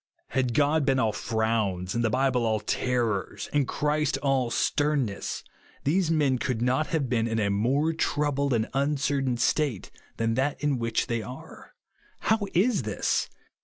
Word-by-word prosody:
Had 125 -1 0
God 150 +1 +3
been 135 -1 +2
all 115 -4 +2
frowns, 110 -5 -1
and 120 - 0
the 115 - +2
Bible 130 0 +1
all 110 -1 +1
terrors, 115 -3 -1
and 145 -3 +2
Christ 150 +1 0
all 135 -3 +2
sternness, 140 -5 0 0.4
these 170 +4 +2
men 145 -6 +2
could 120 -2 -1
not 130 +5 +1
have 150 -4 -1
been 115 -2 +1
in 115 -1 -1
a 100 -2 +1
more 135 +10 +1
troubled 145 -3 0
and 115 -2 +1
uncertain 135 -2 0
state 135 -5 0 0.3
than 115 0 0
that 135 +4 0
in 145 -4 0
which 115 0 0
they 115 -2 -2
are. 125 +4 -11 0.5
How 220 0 +2 0.2
is 205 +3 +3
this 105 -2 -1
130 Hz, 160 wpm, -27 LUFS, 115-145 Hz, 0.5 s, God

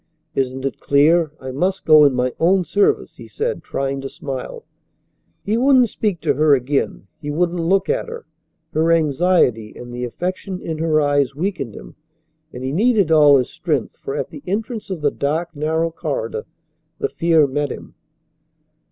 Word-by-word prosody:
"Isn't 130 0 -2
it 135 - -3
clear 155 +3 +3
I 130 0 -6
must 185 +8 -1
go 155 -1 +7
in 140 -3 +3
my 125 0 0
own 185 +3 +3
service?" 200 +4 +1
he - - -11
said, 470 +2 -3
trying 135 0 -3
to 135 - -5
smile. 145 - -7 0.8
He 215 +3 0
wouldn't 255 -1 +4
speak 200 -7 -2
to - - +1
her 150 -1 +4
again. 135 -4 -2 0.2
He 145 - -5
wouldn't 175 +3 0
look 190 +3 +1
at - - -1
her. 470 0 -8 0.5
Her 160 +2 +2
anxiety 150 -8 +2
and 120 0 -9
the 125 0 -4
affection 180 +7 -4
in 160 -3 -5
her 160 -1 +2
eyes 145 -2 +1
weakened 150 - -3
him, - - -12 0.5
and 125 - -8
he 130 - -2
needed 205 - +2
all 150 -3 +7
his 125 - -1
strength, - - -2
for 425 0 -5
at - - -3
the - - -9
entrance 220 +3 -3
of 185 -5 -4
the 145 -1 +2
dark, 160 +4 -2
narrow 160 +3 0
corridor 460 - -4 0.5
the 425 - -1
fear 165 - +3
met 145 +1 -2
him. - - -9
160 Hz, 175 wpm, -20 LUFS, 140-190 Hz, 0.8 s, go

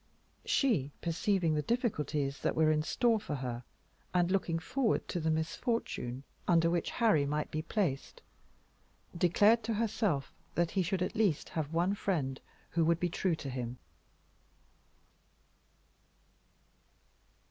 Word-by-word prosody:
She, 205 - +2
perceiving 170 0 +1
the 150 - +1
difficulties 150 - -1
that - - 0
were 155 -1 +4
in 155 0 +2
store 225 +8 +2
for 155 -8 -4
her, 125 -2 -4 0.5
and 175 0 +3
looking 180 -4 +1
forward 230 +8 0
to 180 - -1
the 160 0 0
misfortune 160 - -2 0.2
under 165 -1 +4
which 170 -1 0
Harry 210 -12 +3
might 150 +1 -2
be 155 - -1
placed, 165 -5 -2 0.9
declared 205 +7 +4
to 225 -1 -1
herself 205 - 0 0.2
that 170 -1 +1
he 195 - +1
should 185 +1 0
at - - -2
least 205 -9 +1
have 155 -2 -3
one 175 +4 +2
friend 150 -10 -1 0.3
who 170 - +2
would 165 +1 +3
be 175 - 0
true 175 0 0
to 145 -3 -6
him. 125 -1 -4
165 Hz, 135 wpm, -32 LUFS, 150-200 Hz, 0.9 s, were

